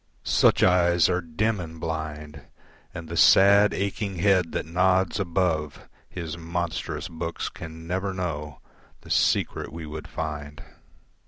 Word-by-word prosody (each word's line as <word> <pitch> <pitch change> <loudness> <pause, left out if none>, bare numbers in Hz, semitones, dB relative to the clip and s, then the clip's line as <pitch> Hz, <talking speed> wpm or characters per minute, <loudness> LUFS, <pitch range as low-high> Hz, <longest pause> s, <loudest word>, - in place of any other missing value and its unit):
Such - - +3
eyes 85 -2 +4
are 90 0 +1
dim 95 +6 -1
and 80 -2 -8
blind, 80 -2 -5 0.5
And 85 -2 -8
the 85 - -6
sad, 100 +4 +6
aching 100 0 -3
head 90 -1 +2
that - - -2
nods 90 +3 +1
above 85 -5 -1 0.2
His 85 -2 -6
monstrous 85 0 -3
books 85 0 -4
can 80 0 -10
never 95 +3 -2
know 75 -7 -5 0.4
The - - -11
secret - - +1
we 80 +1 -7
would 75 0 -7
find. 75 -2 -6
85 Hz, 135 wpm, -25 LUFS, 80-95 Hz, 0.5 s, sad